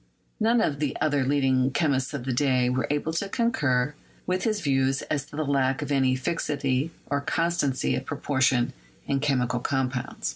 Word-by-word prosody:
None 230 +1 +3
of 145 -9 0
the 150 -3 -1
other 145 -3 +2
leading 130 -1 +2
chemists 135 -3 0
of 125 -3 -5
the 130 - -1
day 125 -1 +2
were 125 -2 0
able 150 +2 -1
to 195 +4 -2
concur 145 - +1 0.3
with 185 0 -1
his 215 -2 +1
views 135 -4 +1
as 145 -2 -2
to 145 - -12
the 155 0 -1
lack 135 -1 +1
of - - -5
any 130 -2 +3
fixity 140 0 -1 0.2
or 140 0 +1
constancy 165 -3 0
of 130 - -3
proportions 130 -4 +1 0.3
in 140 - 0
chemical 125 -4 +1
compounds. 130 -1 -2
140 Hz, 175 wpm, -26 LUFS, 130-150 Hz, 0.3 s, None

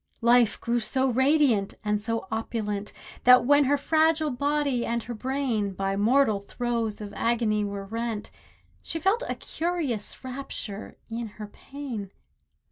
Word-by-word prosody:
Life 235 -1 +4
grew 235 +1 0
so 260 +4 +1
radiant, 260 -5 +3
and 210 -1 0
so 230 -1 -2
opulent, 210 -2 -3 0.3
That 250 0 +7
when 285 +2 +5
her 285 +2 +3
fragile 315 +1 +2
body 280 -1 0
and 235 0 -1
her 240 - -5
brain 240 -4 -1
By 195 +1 -1
mortal 220 +1 +3
throes 230 +1 -2
of 205 -1 -7
agony 230 -2 +1
were 200 -1 -4
rent, 225 0 -4 0.5
She 325 - -4
felt 390 +8 +2
a - - -1
curious 315 -11 -3
rapture 250 -5 -6
in 230 0 -4
her 215 - -5
pain. 235 -2 -7
235 Hz, 140 wpm, -27 LUFS, 210-275 Hz, 0.5 s, That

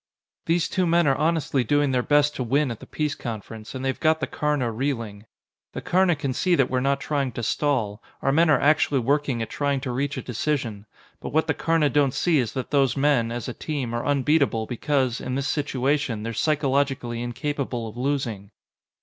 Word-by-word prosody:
"These 170 0 +2
two 185 -1 0
men 170 +1 +3
are 135 - +4
honestly 155 -4 +1
doing 145 +3 +2
their 125 -1 +2
best 145 +2 +3
to 130 - -2
win 135 +3 +1
at 115 - -6
the - - -12
peace 150 -2 -2
conference, 110 -1 -7
and 130 0 -4
they've 130 - -1
got 160 0 +3
the - - -1
Karna 145 -5 -1
reeling. 115 -4 -3 0.5
The - - -5
Karna 180 -1 +3
can 140 -3 -3
see 180 +6 +2
that 135 -5 +2
we're 130 - +1
not 140 +1 +1
trying 140 -4 -1
to 120 - -5
stall; 115 -5 0 0.2
our 135 - +3
men 165 +3 +4
are 150 - +5
actually 150 -1 +3
working 135 -1 0
at 110 - -8
trying 140 -1 0
to 130 - -3
reach 140 +3 -2
a - - -4
decision. 115 -4 -2 0.3
But - - -7
what 160 +1 +3
the 160 - +1
Karna 165 -3 +1
don't 140 -2 +2
see 165 -4 +2
is 115 -3 -1
that 130 - -4
those 140 -2 +2
men, 135 -5 +2
as 120 -1 -4
a 125 - -4
team, 135 -6 -4
are 120 - -2
unbeatable 140 -4 +2
because, 130 +1 -1
in 130 - -3
this 140 +1 -1
situation, 135 -4 -1
they're 115 +1 -3
psychologically 135 -3 0
incapable 125 -1 -3
of 110 - -9
losing." 125 -6 -2
135 Hz, 205 wpm, -24 LUFS, 120-150 Hz, 0.5 s, are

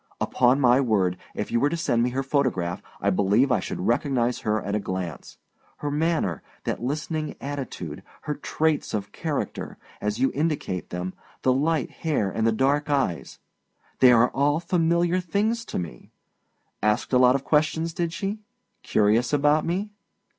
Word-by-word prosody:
Upon 125 +2 +3
my 125 0 +5
word, 100 -8 +2 0.2
if - - -4
you 120 - +2
were 145 - +3
to 170 - -2
send 120 -7 +1
me 120 - +2
her 135 +2 -2
photograph, 130 -11 0 0.2
I - - +1
believe 105 +8 +3
I 125 - +3
should - - -5
recognize 120 +2 +1
her 110 0 0
at 100 - -4
a 105 - +1
glance. 95 -6 -5 0.4
Her 145 - -3
manner, 155 - 0 0.2
that - - -2
listening 155 +4 -3
attitude, 140 -3 -5 0.2
her 150 - -2
traits 155 -2 -1
of 100 -1 -4
character, 155 -4 -4 0.2
as 105 0 -1
you 130 +2 +2
indicate 145 - -2
them, 90 +1 -4 0.3
the 130 - +4
light 150 +1 0
hair 140 - -1
and 110 +4 0
the - - +4
dark 140 +6 +1
eyes 135 - -1 0.6
they 130 -1 +8
are 120 0 +5
all 145 +3 +2
familiar 170 +1 +2
things 210 +6 0
to - - -5
me. 80 -9 -6 0.7
Asked 105 +4 +1
a 125 - +6
lot 125 0 +6
of 135 - -1
questions, 160 +2 +1
did 170 -1 -1
she? 195 +5 -3 0.4
Curious 110 +4 +2
about 150 +1 +3
me? 195 +5 -2
135 Hz, 170 wpm, -25 LUFS, 110-155 Hz, 0.7 s, they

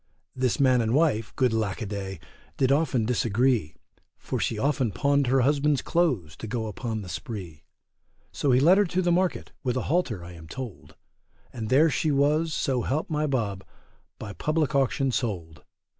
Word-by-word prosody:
This 130 -1 0
man 130 -3 +4
and 115 +2 0
wife, 125 -9 +2
good 125 -3 +2
lack 110 -4 -1
a 115 - -3
day, 95 -3 -5 0.4
did 130 -1 +2
often 140 -6 +2
disagree; 120 - +1 0.4
For - - -4
she 110 - -1
often 130 -1 0
pawned 140 +3 +1
her 130 +1 +3
husband's 145 +1 +2
clothes 125 - 0
to 110 - -7
go 115 0 -2
upon 110 +1 -4
the - - -9
spree. 90 -6 -7 0.7
So 145 - -1
he 125 - +5
led 175 +8 +6
her 205 - +4
to 185 +1 -1
the 175 - +2
market, 180 +1 0
with 125 -2 0
a - - -1
halter, 120 - 0
I 85 - -9
am 80 -2 -12
told, 110 - -8 0.6
And 110 -3 -5
there 150 +5 +5
she 155 - 0
was, 150 +3 +2
so 130 -4 0
help 150 +7 -2
my 150 0 0
Bob, 105 -8 -2 0.5
by 105 -2 -7
public 155 +2 0
auction 135 0 +1
sold. 85 - -3
125 Hz, 180 wpm, -26 LUFS, 105-145 Hz, 0.7 s, led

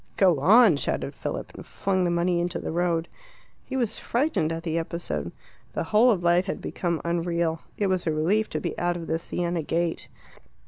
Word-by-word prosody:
"Go 180 -7 +4
on!" 200 - +6
shouted - - -2
Philip, - - -5
and - - -9
flung 185 -2 -1
the - - +1
money 170 0 +1
into 175 0 -1
the - - -4
road. 170 0 0 0.6
He 265 - -4
was 240 -5 -1
frightened 240 - 0
at 165 0 -4
the 165 -1 -1
episode; 170 +1 -4 0.4
the - - -1
whole 220 +3 +4
of 190 -7 +2
life 175 +2 +3
had 190 - -3
become 170 -3 -2
unreal. 170 -1 0 0.2
It 205 - +1
was 185 -2 0
a - - +3
relief 180 +8 +1
to - - -2
be 170 - -3
out 175 0 0
of 170 - -6
the 165 0 -1
Siena 175 0 -2
gate. 165 +2 -2
175 Hz, 195 wpm, -26 LUFS, 165-190 Hz, 0.6 s, on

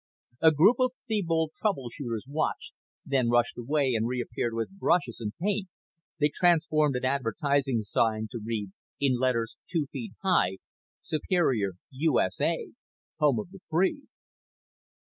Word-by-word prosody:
A 160 - +8
group 185 - +5
of 255 -1 +2
Thebold 165 -8 0
troubleshooters 125 - -2
watched, 150 +3 -2 0.3
then 130 -4 +1
rushed 120 0 +2
away 135 +2 0
and 115 0 +1
reappeared 120 -1 -2
with 115 +13 -4
brushes 170 -12 +1
and 105 -3 -3
paint. 200 +1 0 0.5
They 150 -1 +3
transformed 155 -5 +3
an 125 0 -1
advertising 135 -1 +1
sign 110 +1 +1
to 120 - -5
read, 105 -3 -3 0.3
in 130 -3 +2
letters 115 -3 0
two 165 -5 0
feet 220 - -6
high: 95 - +2 0.5
SUPERIOR, 140 - +1 0.2
U.S.A., 135 - 0 0.5
HOME 145 -5 +4
OF 175 - -12
THE 195 - -12
FREE. 190 - +1
140 Hz, 130 wpm, -28 LUFS, 115-165 Hz, 0.5 s, A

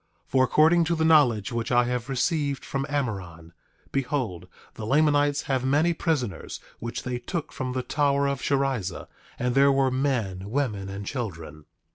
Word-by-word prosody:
For 130 0 +2
according 160 +6 +4
to 170 +1 +1
the 160 0 +1
knowledge 130 -10 +4
which 115 0 -2
I 120 0 +5
have 125 +1 -3
received 140 +1 0
from 135 0 -3
Amoron, 95 - -4 0.4
behold, 125 - -2 0.3
the 110 - -8
Lamanites 145 +3 +2
have 130 -3 -1
many 150 +6 +2
prisoners, 130 - -2 0.2
which 115 0 -5
they 125 -1 -3
took 170 +3 -4
from 130 -1 -4
the 130 0 -2
tower 140 0 +1
of 140 -1 -2
Sherrizah; 135 -10 -1 0.3
and 125 0 -1
there 140 +1 +5
were 135 -1 +2
men, 115 -8 -1
women, 105 -7 -2
and 100 +1 -6
children. 85 - -6
130 Hz, 160 wpm, -26 LUFS, 115-145 Hz, 0.4 s, I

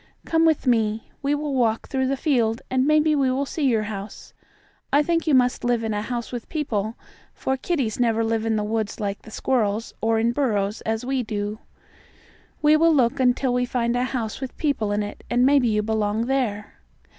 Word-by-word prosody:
"Come 325 0 +2
with 315 -3 +1
me. 225 -3 +1
We 285 +1 +1
will 295 -1 -3
walk 230 -4 +1
through 265 -2 0
the 275 +1 0
field, 235 -6 +1
and 260 +1 +2
maybe 305 0 +4
we 275 -2 +2
will 265 +2 0
see 295 +1 -2
your 225 -4 +2
house. 205 -1 -7 0.6
I 290 +2 +4
think 335 0 0
you 300 - +4
must 250 -1 +2
live 240 -1 +1
in 220 -1 -1
a 210 - -1
house 235 +1 -4
with 240 -2 -6
people, 230 -8 -2 0.4
for 265 - -1
kitties 265 -6 -2
never 230 -2 +2
live 225 0 0
in 225 -1 0
the 210 - 0
woods 215 0 -2
like 200 -1 -3
the - - -13
squirrels, 220 -2 -1
or 225 0 +2
in 230 +1 +2
burrows 215 -6 -1
as 225 +2 -1
we 265 0 0
do. 210 -1 -4 1.0
We 300 +1 +6
will 330 0 +4
look 245 -3 +2
until 255 0 +2
we 250 0 +1
find 235 -1 0
a 245 +1 +1
house 240 -2 -4
with 265 - -6
people 275 -9 0
in 205 0 0
it, 205 - -8
and 245 +1 +3
maybe 275 -2 +4
you 210 -1 +1
belong 220 0 0
there." 235 -6 -2
240 Hz, 205 wpm, -23 LUFS, 220-270 Hz, 1.0 s, We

